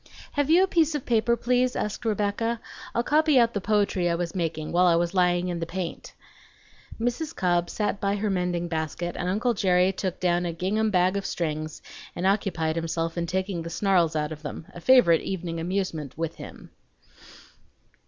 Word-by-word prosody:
"Have 285 0 0
you 345 +4 +6
a - - +2
piece 325 -4 +2
of 290 - -3
paper, 235 0 +2
please?" 250 +1 +1
asked 210 +2 -3
Rebecca. 220 +2 0 0.4
"I'll 235 - +2
copy 305 +1 +3
out 235 -1 +4
the 200 - -2
poetry 200 -4 +1
I 170 - +1
was 170 -1 -3
making 160 -4 -3
while 180 +1 +4
I 170 - +5
was 170 +1 0
lying 180 -1 +2
in 175 -1 -3
the 165 - -3
paint." 175 -1 -5 0.8
Mrs. 245 +8 -2
Cobb 175 -2 +1
sat 205 -1 -2
by 200 0 +1
her 205 0 -1
mending 180 -2 -1
basket, 165 +1 -3
and 180 - -2
uncle 220 +6 +1
Jerry 185 -2 +3
took 185 -1 -3
down 175 -1 +1
a 170 - -3
gingham 205 +6 0
bag 185 0 +2
of 200 - -4
strings 155 -2 -3 0.3
and 175 - -3
occupied 175 -5 0
himself 165 0 -2
in 170 -1 -2
taking 185 0 -2
the 165 - -6
snarls 175 -3 +2
out 150 0 -1
of 150 -1 -7
them, 155 +1 -7
a 175 - -9
favorite 240 -8 +5
evening 175 -3 -4
amusement 165 -6 -3
with 165 -1 -3
him. - - -11
180 Hz, 190 wpm, -26 LUFS, 170-215 Hz, 0.8 s, you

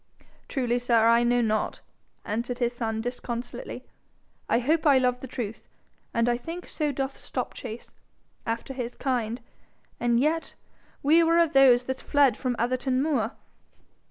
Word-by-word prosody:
'Truly, 245 -3 0
sir, 235 -2 +3
I 235 +1 +5
know 240 0 +3
not,' 215 -2 0 0.5
answered 235 +3 -2
his 240 -1 0
son, 220 -2 -2
disconsolately. 245 - -5 0.7
'I 230 - +4
hope 305 +6 +1
I 280 -2 +7
love 250 -1 +2
the 265 - -7
truth, 225 -5 -6 0.4
and 230 0 +1
I 240 0 +2
think 335 +7 -7
so 300 -2 -1
doth 270 0 -3
Stopchase, 235 -1 -5 0.5
after 230 +3 -3
his 245 -2 -5
kind; 245 -3 -1 0.6
and 240 -1 +2
yet 315 +4 0 0.5
were 315 +4 +6
we 335 +1 +4
of 335 -2 +3
those 260 -3 +6
that 260 +1 -4
fled 280 -5 +3
from 250 +1 -2
Atherton 255 +2 0
moor.' 265 -6 0
245 Hz, 150 wpm, -27 LUFS, 235-270 Hz, 0.7 s, I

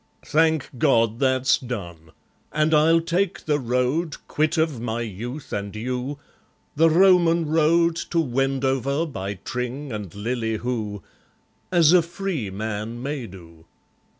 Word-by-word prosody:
Thank 160 -2 +2
God, 115 -5 +3
that's 130 -1 +3
done! 85 -10 -7 0.4
and 155 +1 +1
I'll 160 +2 +5
take 175 +3 -1
the 150 -1 +1
road, 130 +6 0
Quit 155 +2 0
of 160 -7 0
my 115 0 -2
youth 120 +6 -6
and 100 0 -4
you, 125 +5 -3 0.6
The 165 +2 +5
Roman 170 -1 +4
road 165 +2 +3
to 170 - +1
Wendover 135 +1 0
By 100 - -5
Tring 125 +7 -5
and 105 -3 -5
Lilley 110 +1 -2
Hoo, 105 -5 -4 0.7
As 170 -2 +5
a 180 - +7
free 170 - -4
man 110 +4 -5
may 140 -3 -4
do. 85 -3 -14
130 Hz, 130 wpm, -23 LUFS, 115-160 Hz, 0.7 s, a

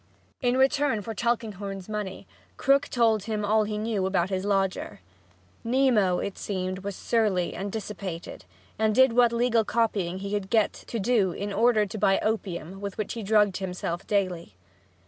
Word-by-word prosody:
In 245 +1 +2
return 265 -4 +2
for 225 - -5
Mr. - - -19
Tulkinghorn's 205 -5 -2
money 210 -3 -5 0.3
Krook 275 +1 +3
told 225 -4 +2
him 215 -2 -2
all 215 +1 +3
he 210 0 -3
knew 210 -3 -1
about 190 0 0
his 190 0 -1
lodger. 195 - -1 0.6
Nemo, 230 -7 +3
it 200 - -4
seemed, 185 -1 -3
was 200 0 -5
surly 205 -7 0
and 200 +1 -4
dissipated 195 - -6 0.3
and 220 -1 +2
did 260 -1 +5
what 240 -1 +5
legal 235 -1 +2
copying 210 -6 0
he 200 +1 -5
could 205 -2 -2
get 220 -1 +3
to 235 - -7
do 205 -4 +2
in 200 +2 -4
order 220 0 +3
to 205 +2 -6
buy 195 0 +4
opium 195 -4 -3
with 200 -1 -5
which 215 - -3
he 230 - -5
drugged 210 -2 +3
himself 180 -1 -4
daily. 180 - -1
205 Hz, 170 wpm, -26 LUFS, 190-225 Hz, 0.6 s, did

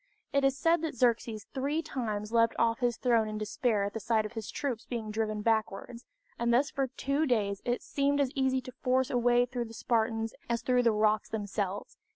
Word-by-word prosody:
It 280 0 +3
is 270 0 +2
said 330 +2 +3
that 320 -4 -3
Xerxes 230 -3 +1
three 285 +5 -1
times 215 -7 -3
leapt 230 0 +3
off 230 +1 +2
his 245 -2 +1
throne 230 -3 +2
in 215 0 -4
despair 215 0 0
at 200 0 -3
the 225 - -3
sight 220 0 +1
of 215 - -5
his 225 -3 -6
troops 260 -6 -3
being 225 -3 -4
driven 215 -1 -2
backwards; 225 +2 -1 0.3
and 235 0 +1
thus 265 +5 +3
for 270 -1 0
two 275 +4 -1
days 205 -5 0
it 245 0 -1
seemed 285 0 +1
as 275 -3 +2
easy 265 -1 +1
to 255 0 -9
force 260 0 0
a 245 - +1
way 245 0 +4
through 245 -1 -3
the 225 0 -10
Spartans 225 -1 0 0.2
as 235 -1 -1
through 250 0 +3
the 235 -2 +4
rocks 215 0 +2
themselves. 205 -2 -3
235 Hz, 210 wpm, -30 LUFS, 220-260 Hz, 0.3 s, way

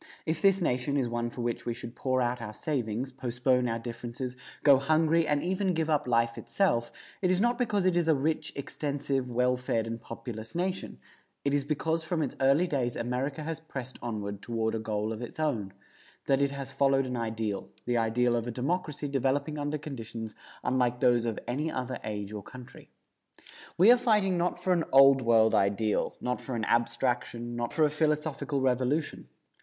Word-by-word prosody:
If 160 0 -1
this 195 -1 +4
nation 135 -2 0
is 130 -3 +1
one 120 0 -2
for 120 - -7
which 120 0 -3
we 120 - -1
should 120 0 -8
pour 130 -1 +1
out 120 0 -1
our 105 -1 -6
savings, 130 -3 -2
postpone 125 0 +1
our 115 - -1
differences, 120 +2 -6 0.3
go 140 -2 +8
hungry, 160 +3 +3
and 150 -1 +1
even 185 0 0
give 160 -1 0
up 150 -3 +1
life 115 -1 +2
itself, 120 -1 +1 0.3
it 185 - +2
is 185 0 +3
not 240 +3 +2
because 210 -6 +1
it 185 -2 +3
is 175 -2 +2
a 160 - +5
rich, 155 +2 -1
extensive, 140 -2 -2
well 125 +1 +2
fed 115 -3 -1
and 115 0 -5
populous 115 +2 -8
nation; 180 - -2 0.5
it 140 - +2
is 145 -1 +2
because 160 +3 -1
from 160 0 -1
its 135 - -4
early 140 +6 +4
days 130 -8 -1
America 130 +5 -2
has 160 0 -4
pressed 130 -5 -8
onward 105 -4 -4
toward 115 -1 -1
a 115 - -1
goal 110 0 -2
of 110 - -7
its 120 - -7
own; 115 -11 -1 0.5
that 135 0 +3
it 140 - +3
has 135 -1 -6
followed 135 -1 +3
an 125 -1 -3
ideal, 110 -3 -3 0.2
the 120 - 0
ideal 120 +1 +2
of 115 0 -1
a - - -2
democracy 150 +4 -2
developing 140 +2 0
under 145 +1 -1
conditions 115 -6 -7 0.3
unlike 125 -1 +1
those 120 -2 +3
of 115 -2 -2
any 150 +6 -1
other 130 -1 -3
age 105 -1 -4
or 105 - -5
country. 125 +4 -12 0.9
We 195 +7 +8
are 250 - +7
fighting 210 -6 +2
not 175 +1 0
for 185 - +1
an 170 -2 +2
Old 135 0 +7
World 115 -2 +4
ideal, 105 +1 +1
not 125 0 -2
for 130 - -5
an 115 -1 -1
abstraction, 120 0 0
not 120 0 -2
for 160 - +2
a 150 - +1
philosophical 150 -2 0
revolution. 130 +4 0
130 Hz, 190 wpm, -29 LUFS, 120-150 Hz, 0.9 s, go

